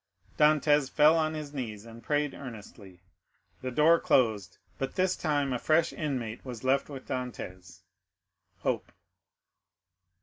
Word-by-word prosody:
Dantès 150 Hz, -2 st, +4 dB
fell 155 Hz, +2 st, +5 dB
on 155 Hz, -1 st, 0 dB
his 150 Hz, -2 st, -6 dB
knees, 110 Hz, -6 st, -5 dB
and 115 Hz, 0 st, -12 dB
prayed 145 Hz, +1 st, 0 dB
earnestly. 105 Hz, -7 st, -11 dB, 0.6 s
The 130 Hz, -, -3 dB
door 155 Hz, +6 st, +4 dB
closed; 105 Hz, -8 st, +1 dB, 0.2 s
but 135 Hz, 0 st, -3 dB
this 185 Hz, 0 st, +2 dB
time 145 Hz, -4 st, 0 dB
a 125 Hz, -, -1 dB
fresh 160 Hz, +4 st, +2 dB
inmate 125 Hz, -8 st, -4 dB
was 125 Hz, -3 st, -8 dB
left 135 Hz, +2 st, +1 dB
with 135 Hz, -3 st, -8 dB
Dantès—Hope. 90 Hz, -9 st, -7 dB
135 Hz, 125 wpm, -29 LUFS, 115-150 Hz, 0.6 s, fell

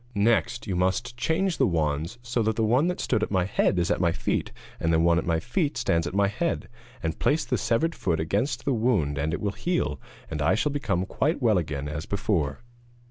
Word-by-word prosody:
Next 100 Hz, -3 st, +2 dB
you 95 Hz, -, -2 dB
must 95 Hz, +7 st, 0 dB
change 165 Hz, +8 st, 0 dB
the 135 Hz, -, +4 dB
wands 80 Hz, +3 st, -1 dB
so 120 Hz, 0 st, -1 dB
that 110 Hz, 0 st, +1 dB
the 115 Hz, -, +1 dB
one 125 Hz, +9 st, +3 dB
that 180 Hz, -, -2 dB
stood 110 Hz, -4 st, 0 dB
at -, -, -1 dB
my 95 Hz, -3 st, +1 dB
head 95 Hz, 0 st, +1 dB
is 90 Hz, +2 st, +1 dB
at -, -, +1 dB
my 85 Hz, -2 st, +3 dB
feet, -, -, -2 dB, 0.3 s
and 80 Hz, -, +1 dB
the 80 Hz, -, +3 dB
one 85 Hz, 0 st, +4 dB
at -, -, -5 dB
my 80 Hz, -1 st, +2 dB
feet 145 Hz, -, -1 dB
stands 85 Hz, 0 st, +1 dB
at 90 Hz, -, -5 dB
my 100 Hz, 0 st, +4 dB
head, 165 Hz, +12 st, -2 dB, 0.4 s
and 80 Hz, -1 st, -2 dB
place 155 Hz, +2 st, +2 dB
the -, -, 0 dB
severed 160 Hz, +9 st, +1 dB
foot 85 Hz, -, -1 dB
against 100 Hz, -, -1 dB
the 140 Hz, -, +2 dB
wound 105 Hz, -, +1 dB
and 80 Hz, +2 st, 0 dB
it 85 Hz, -, -3 dB
will 100 Hz, -, 0 dB
heal, 100 Hz, -, -1 dB, 0.3 s
and 80 Hz, -2 st, -4 dB
I 80 Hz, +6 st, +3 dB
shall 145 Hz, +7 st, 0 dB
become 100 Hz, -11 st, -1 dB
quite 150 Hz, -, 0 dB
well 110 Hz, -7 st, +3 dB
again 75 Hz, -3 st, -4 dB
as 75 Hz, +2 st, -5 dB
before.' 100 Hz, -4 st, -1 dB
100 Hz, 230 wpm, -26 LUFS, 85-120 Hz, 0.4 s, the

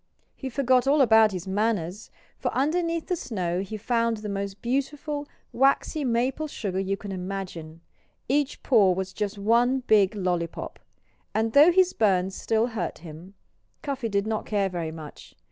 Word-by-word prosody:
He 265 Hz, -, -6 dB
forgot 255 Hz, 0 st, +2 dB
all 290 Hz, +2 st, +4 dB
about 220 Hz, -4 st, +6 dB
his 185 Hz, 0 st, -6 dB
manners, 205 Hz, -1 st, -1 dB, 0.3 s
for -, -, -1 dB
underneath 330 Hz, +4 st, 0 dB
the 360 Hz, -, -1 dB
snow 185 Hz, -, -2 dB
he 200 Hz, +3 st, -5 dB
found 230 Hz, +1 st, 0 dB
the 210 Hz, 0 st, -6 dB
most 200 Hz, 0 st, -4 dB
beautiful, 285 Hz, +3 st, -2 dB, 0.3 s
waxy 275 Hz, +3 st, +2 dB
maple 255 Hz, +5 st, 0 dB
sugar 195 Hz, -9 st, -3 dB
you 195 Hz, +1 st, -1 dB
can 205 Hz, -1 st, -8 dB
imagine. 180 Hz, -4 st, -6 dB, 0.5 s
Each 285 Hz, +1 st, 0 dB
paw 205 Hz, -8 st, +4 dB
was 190 Hz, +1 st, -4 dB
just 205 Hz, +1 st, -3 dB
one 240 Hz, +5 st, +2 dB
big 215 Hz, -3 st, +3 dB
lollypop! 180 Hz, -4 st, -3 dB, 0.6 s
And 220 Hz, +1 st, 0 dB
though 300 Hz, +5 st, +8 dB
his 370 Hz, 0 st, +3 dB
burns 190 Hz, -3 st, +2 dB
still 225 Hz, +3 st, 0 dB
hurt 220 Hz, -, -3 dB
him, 170 Hz, +5 st, -11 dB, 0.5 s
Cuffy 275 Hz, -5 st, -3 dB
did 200 Hz, -1 st, 0 dB
not 220 Hz, -1 st, -3 dB
care 200 Hz, -2 st, +1 dB
very 170 Hz, -3 st, -4 dB
much. 155 Hz, -2 st, -11 dB
215 Hz, 160 wpm, -26 LUFS, 190-260 Hz, 0.6 s, though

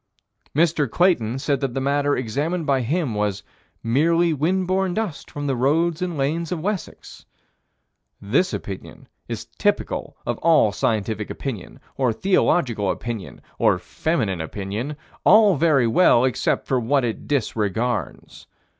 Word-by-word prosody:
Mr. 155 Hz, -3 st, +2 dB
Clayton 130 Hz, -, +2 dB
said 140 Hz, 0 st, 0 dB
that 135 Hz, -3 st, -3 dB
the -, -, 0 dB
matter 145 Hz, +1 st, +1 dB
examined 145 Hz, +8 st, -2 dB
by 135 Hz, -3 st, +2 dB
him 145 Hz, +1 st, -1 dB
was 105 Hz, -2 st, -1 dB, 0.4 s
"merely 165 Hz, +8 st, +2 dB
wind 180 Hz, +6 st, 0 dB
borne 185 Hz, 0 st, 0 dB
dust 215 Hz, -9 st, -4 dB
from 145 Hz, 0 st, -5 dB
the 135 Hz, -2 st, 0 dB
roads 155 Hz, +7 st, +1 dB
and 175 Hz, -3 st, -2 dB
lanes 155 Hz, +4 st, -1 dB
of 180 Hz, -, -1 dB
Wessex." 195 Hz, +2 st, -5 dB, 1.0 s
This 160 Hz, -, +1 dB
opinion 95 Hz, -2 st, -7 dB, 0.2 s
is -, -, -5 dB
typical -, -, -1 dB
of -, -, -2 dB
all 160 Hz, -10 st, +4 dB
scientific 105 Hz, 0 st, -1 dB
opinion 115 Hz, -10 st, -6 dB, 0.2 s
or 130 Hz, -3 st, +2 dB
theological 120 Hz, -, +1 dB
opinion 115 Hz, -5 st, -5 dB, 0.2 s
or -, -, +4 dB
feminine 110 Hz, -, -2 dB
opinion 105 Hz, -, -5 dB, 0.3 s
all 210 Hz, -3 st, +6 dB
very 145 Hz, -4 st, +3 dB
well 120 Hz, 0 st, +4 dB
except 130 Hz, -, 0 dB
for 130 Hz, -, +1 dB
what 125 Hz, +3 st, +1 dB
it 115 Hz, -, -4 dB
disregards. 115 Hz, -3 st, -2 dB
140 Hz, 135 wpm, -22 LUFS, 115-170 Hz, 1.0 s, all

